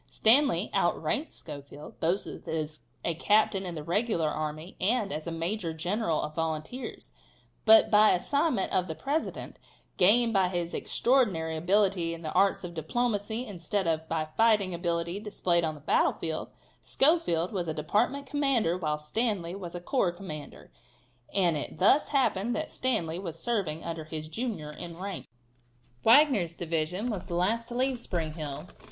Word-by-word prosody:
Stanley 270 Hz, +6 st, +3 dB
outranked 300 Hz, +3 st, 0 dB
Schofield, 145 Hz, -1 st, -10 dB
both 175 Hz, +5 st, 0 dB
as 155 Hz, -1 st, -5 dB, 0.3 s
a 170 Hz, -, +1 dB
captain 195 Hz, +2 st, +2 dB
in 175 Hz, -, -5 dB
the 155 Hz, -, -5 dB
regular 175 Hz, -1 st, 0 dB
army 155 Hz, +3 st, -5 dB
and 210 Hz, 0 st, +1 dB
as 155 Hz, +2 st, -5 dB
a -, -, -2 dB
major 165 Hz, +1 st, -2 dB
general 175 Hz, 0 st, -1 dB
of 150 Hz, -, -5 dB
volunteers, 160 Hz, +10 st, -4 dB, 0.5 s
but 220 Hz, 0 st, +7 dB
by 215 Hz, 0 st, +7 dB
assignment 280 Hz, -, 0 dB
of 185 Hz, 0 st, +1 dB
the 160 Hz, -, -4 dB
President, 285 Hz, -, -3 dB, 0.4 s
gained 225 Hz, +5 st, +5 dB
by 190 Hz, -2 st, +3 dB
his 175 Hz, -2 st, -3 dB
extraordinary 200 Hz, -11 st, +1 dB
ability 180 Hz, 0 st, +1 dB
in 165 Hz, -, -12 dB
the 155 Hz, -, -3 dB
arts 195 Hz, -1 st, +2 dB
of 175 Hz, -1 st, -6 dB
diplomacy 220 Hz, -, -1 dB
instead 195 Hz, -1 st, -2 dB
of 160 Hz, -1 st, -1 dB
by 160 Hz, -1 st, 0 dB
fighting 215 Hz, -5 st, +3 dB
ability 170 Hz, +1 st, -2 dB
displayed 185 Hz, -5 st, 0 dB
on 155 Hz, -1 st, -1 dB
the -, -, -11 dB
battle -, -, +2 dB
field, 160 Hz, -1 st, -4 dB, 0.3 s
Schofield 270 Hz, -, +2 dB
was 180 Hz, -4 st, -2 dB
a -, -, -1 dB
department 225 Hz, -, 0 dB
commander 265 Hz, -, +1 dB
while 155 Hz, -3 st, -1 dB
Stanley 175 Hz, +2 st, -1 dB
was 180 Hz, -3 st, -7 dB
a -, -, -3 dB
corps 185 Hz, 0 st, +1 dB
commander, 155 Hz, -, -9 dB, 0.6 s
and 180 Hz, -5 st, +2 dB
it 145 Hz, -, -4 dB
thus 235 Hz, +10 st, +4 dB
happened 240 Hz, -5 st, +1 dB
that 310 Hz, -, -3 dB
Stanley 180 Hz, -10 st, -1 dB
was 170 Hz, -4 st, -6 dB
serving 185 Hz, -8 st, -2 dB
under 165 Hz, -2 st, -5 dB
his 155 Hz, 0 st, -6 dB
junior 195 Hz, -6 st, -4 dB
in 170 Hz, +2 st, -8 dB
rank. 195 Hz, +1 st, -6 dB, 0.8 s
Wagner's 225 Hz, -, +5 dB
division 170 Hz, +7 st, -2 dB
was 195 Hz, -4 st, -5 dB
the 175 Hz, -, -4 dB
last 220 Hz, +7 st, +1 dB
to 240 Hz, -, -6 dB
leave 255 Hz, 0 st, 0 dB
Spring 165 Hz, -8 st, -2 dB
Hill. 150 Hz, -4 st, -6 dB
180 Hz, 160 wpm, -29 LUFS, 160-220 Hz, 0.8 s, but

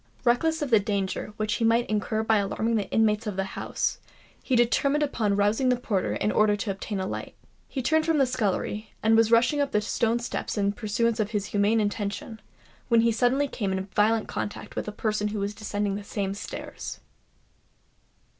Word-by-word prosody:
Reckless 310 Hz, +6 st, +2 dB
of 275 Hz, -, -4 dB
the 220 Hz, -, +7 dB
danger 200 Hz, -1 st, -2 dB
which 215 Hz, 0 st, -1 dB
he -, -, -1 dB
might 230 Hz, +1 st, +3 dB
incur 215 Hz, +1 st, -1 dB
by 220 Hz, 0 st, +3 dB
alarming 210 Hz, +3 st, 0 dB
the 205 Hz, -3 st, -1 dB
inmates 220 Hz, 0 st, +2 dB
of 205 Hz, -, -3 dB
the 195 Hz, -, 0 dB
house, 190 Hz, -, -2 dB, 0.4 s
he 260 Hz, -, 0 dB
determined 275 Hz, +5 st, +3 dB
upon 220 Hz, -8 st, 0 dB
rousing 205 Hz, +6 st, +2 dB
the 250 Hz, -, +4 dB
porter 215 Hz, -6 st, -1 dB
in 210 Hz, -, 0 dB
order 215 Hz, -1 st, +3 dB
to 205 Hz, 0 st, -2 dB
obtain 195 Hz, +1 st, -4 dB
a 190 Hz, -, -1 dB
light. -, -, -5 dB, 0.3 s
He 265 Hz, -, -4 dB
turned 315 Hz, +4 st, +2 dB
from 325 Hz, -2 st, +3 dB
the 275 Hz, -, +4 dB
scullery, 215 Hz, -3 st, -2 dB
and 220 Hz, +1 st, +5 dB
was 225 Hz, 0 st, +4 dB
rushing 245 Hz, +5 st, +4 dB
up 280 Hz, -1 st, -1 dB
the 210 Hz, -, +4 dB
stone 225 Hz, +2 st, 0 dB
steps 235 Hz, -1 st, -4 dB
in 200 Hz, 0 st, +2 dB
pursuance 230 Hz, +1 st, -1 dB
of 210 Hz, -1 st, 0 dB
his 210 Hz, -3 st, -2 dB
humane 205 Hz, +2 st, +3 dB
intention, 210 Hz, +2 st, -3 dB, 0.5 s
when 235 Hz, -2 st, +5 dB
he 230 Hz, 0 st, +3 dB
suddenly 255 Hz, +5 st, +2 dB
came 205 Hz, -7 st, -3 dB
in 190 Hz, 0 st, -2 dB
violent 220 Hz, +1 st, +3 dB
contact 205 Hz, -, -5 dB
with -, -, -3 dB
a -, -, -2 dB
person 210 Hz, -1 st, -1 dB
who 210 Hz, 0 st, -3 dB
was 200 Hz, +1 st, -2 dB
descending 205 Hz, -1 st, -2 dB
the 205 Hz, +1 st, -4 dB
same 200 Hz, -1 st, -3 dB
stairs. 200 Hz, -, -7 dB
215 Hz, 200 wpm, -26 LUFS, 205-235 Hz, 0.5 s, the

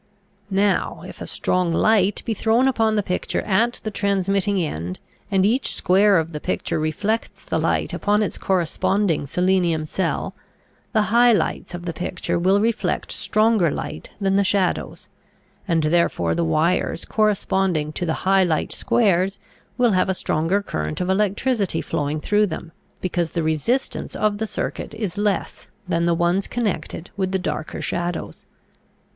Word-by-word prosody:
Now 195 Hz, 0 st, +1 dB
if -, -, -11 dB
a -, -, -5 dB
strong 180 Hz, -2 st, 0 dB
light 200 Hz, +2 st, +2 dB
be 225 Hz, -, 0 dB
thrown 225 Hz, +5 st, +2 dB
upon 225 Hz, -4 st, +2 dB
the 210 Hz, -, +1 dB
picture 180 Hz, -, -2 dB
at 225 Hz, +4 st, +2 dB
the 215 Hz, -, -3 dB
transmitting 200 Hz, 0 st, +1 dB
end, 90 Hz, -, -3 dB, 0.3 s
and 195 Hz, -2 st, +3 dB
each 240 Hz, +5 st, +1 dB
square 195 Hz, +2 st, +4 dB
of 165 Hz, 0 st, -1 dB
the 150 Hz, -, -5 dB
picture -, -, -2 dB
reflects 200 Hz, +9 st, -2 dB
the -, -, -1 dB
light -, -, 0 dB
upon 210 Hz, +1 st, +1 dB
its 205 Hz, -, -4 dB
corresponding 180 Hz, -2 st, 0 dB
selenium 180 Hz, -1 st, +1 dB
cell, 185 Hz, +4 st, -2 dB, 0.6 s
the 215 Hz, -2 st, +3 dB
high 240 Hz, +1 st, +6 dB
lights 205 Hz, -4 st, -1 dB
of 175 Hz, 0 st, -8 dB
the 170 Hz, -, -3 dB
picture 175 Hz, 0 st, -2 dB
will 190 Hz, +3 st, +3 dB
reflect 225 Hz, +1 st, -1 dB
stronger 215 Hz, -5 st, +2 dB
light -, -, -5 dB
than 195 Hz, -1 st, +2 dB
the 200 Hz, -, +4 dB
shadows, 190 Hz, -2 st, -1 dB, 0.6 s
and 165 Hz, -3 st, +2 dB
therefore 170 Hz, +3 st, +2 dB
the 170 Hz, -, 0 dB
wires 165 Hz, +2 st, +1 dB
corresponding 190 Hz, -7 st, +1 dB
to -, -, -4 dB
the 160 Hz, -2 st, 0 dB
high 195 Hz, 0 st, +5 dB
light 160 Hz, -4 st, 0 dB
squares 195 Hz, -3 st, +2 dB, 0.4 s
will 245 Hz, -2 st, +4 dB
have 185 Hz, 0 st, +2 dB
a 190 Hz, -, +1 dB
stronger 180 Hz, +5 st, 0 dB
current 75 Hz, -, -3 dB
of 180 Hz, +1 st, 0 dB
electricity 205 Hz, -1 st, +1 dB
flowing 145 Hz, +1 st, -2 dB
through 210 Hz, +6 st, +2 dB
them, 165 Hz, -1 st, -6 dB, 0.3 s
because 175 Hz, -2 st, -1 dB
the 170 Hz, 0 st, -2 dB
resistance 160 Hz, -, -1 dB
of 210 Hz, -1 st, 0 dB
the 220 Hz, -, -1 dB
circuit 215 Hz, -, -4 dB
is 205 Hz, -4 st, -4 dB
less 205 Hz, -2 st, -1 dB, 0.2 s
than 170 Hz, -1 st, +1 dB
the 170 Hz, -, +3 dB
ones 175 Hz, +3 st, +1 dB
connected 190 Hz, -7 st, -3 dB
with 190 Hz, -2 st, -1 dB
the 190 Hz, -, +1 dB
darker 160 Hz, -3 st, -4 dB
shadows. 175 Hz, 0 st, -3 dB
190 Hz, 160 wpm, -22 LUFS, 170-210 Hz, 0.6 s, high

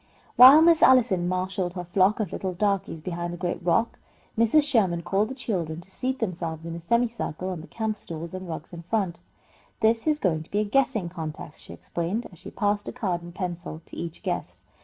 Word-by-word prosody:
While 270 Hz, +5 st, +10 dB
Miss 335 Hz, -1 st, +5 dB
Allison 220 Hz, -9 st, +5 dB
marshalled 185 Hz, 0 st, -2 dB
her 180 Hz, -, -4 dB
flock 185 Hz, +4 st, +2 dB
of 205 Hz, -6 st, -2 dB
little 185 Hz, -2 st, -3 dB
darkies 195 Hz, -5 st, -1 dB
behind 175 Hz, -1 st, -3 dB
the -, -, -6 dB
great 175 Hz, 0 st, -3 dB
rock, 200 Hz, +7 st, +1 dB, 0.4 s
Mrs. 230 Hz, +7 st, +4 dB
Sherman 190 Hz, -11 st, +2 dB
called 200 Hz, +5 st, +1 dB
the 265 Hz, -, -6 dB
children 175 Hz, -, -3 dB
to 185 Hz, +2 st, -13 dB
seat 260 Hz, +5 st, -2 dB
themselves 170 Hz, -7 st, -4 dB
in 165 Hz, -, -5 dB
a -, -, -6 dB
semicircle 230 Hz, -3 st, -1 dB
on 180 Hz, -4 st, -4 dB
the 165 Hz, -, -12 dB
camp 220 Hz, -2 st, -3 dB
stools 165 Hz, -2 st, -7 dB
and 185 Hz, -1 st, -6 dB
rugs 160 Hz, +1 st, -7 dB
in 170 Hz, -, -7 dB
front. 180 Hz, -1 st, -1 dB, 0.6 s
"This 225 Hz, +4 st, +2 dB
is 305 Hz, -1 st, +2 dB
to 165 Hz, -5 st, +1 dB
be 205 Hz, -, -2 dB
a 210 Hz, -, +3 dB
guessing 220 Hz, -4 st, +1 dB
contest," 160 Hz, -3 st, -7 dB
she -, -, -10 dB
explained, 180 Hz, +8 st, -3 dB
as 175 Hz, -, -15 dB
she -, -, -9 dB
passed 205 Hz, 0 st, -1 dB
a -, -, -3 dB
card 190 Hz, -8 st, -2 dB
and 175 Hz, 0 st, -11 dB
pencil 175 Hz, -3 st, -5 dB
to -, -, -12 dB
each 165 Hz, -1 st, -6 dB
guest. -, -, -4 dB
185 Hz, 205 wpm, -26 LUFS, 170-225 Hz, 0.6 s, While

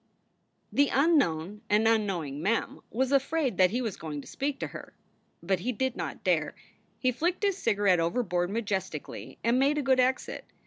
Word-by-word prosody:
The 285 Hz, 0 st, +4 dB
unknown 210 Hz, -, +2 dB
and 215 Hz, +2 st, +4 dB
unknowing 185 Hz, -11 st, 0 dB
Mem 215 Hz, +6 st, -1 dB
was 260 Hz, +3 st, 0 dB
afraid 280 Hz, 0 st, +1 dB
that 185 Hz, -1 st, +6 dB
he 245 Hz, +6 st, -1 dB
was 220 Hz, -5 st, -3 dB
going 150 Hz, -2 st, -5 dB
to -, -, -14 dB
speak 275 Hz, 0 st, -3 dB
to -, -, 0 dB
her. -, -, -10 dB, 0.5 s
But 185 Hz, +1 st, +1 dB
he 245 Hz, +8 st, -1 dB
did 260 Hz, +2 st, -1 dB
not -, -, -5 dB
dare. -, -, +1 dB, 0.4 s
He 255 Hz, -, +1 dB
flicked 345 Hz, -, -1 dB
his 395 Hz, -2 st, +1 dB
cigarette 200 Hz, -5 st, +3 dB
overboard 175 Hz, 0 st, 0 dB
majestically 190 Hz, -, -4 dB
and 235 Hz, +2 st, +3 dB
made 280 Hz, +3 st, +3 dB
a 295 Hz, -, 0 dB
good 260 Hz, -1 st, +3 dB
exit. 255 Hz, +1 st, 0 dB
225 Hz, 175 wpm, -28 LUFS, 180-265 Hz, 0.5 s, that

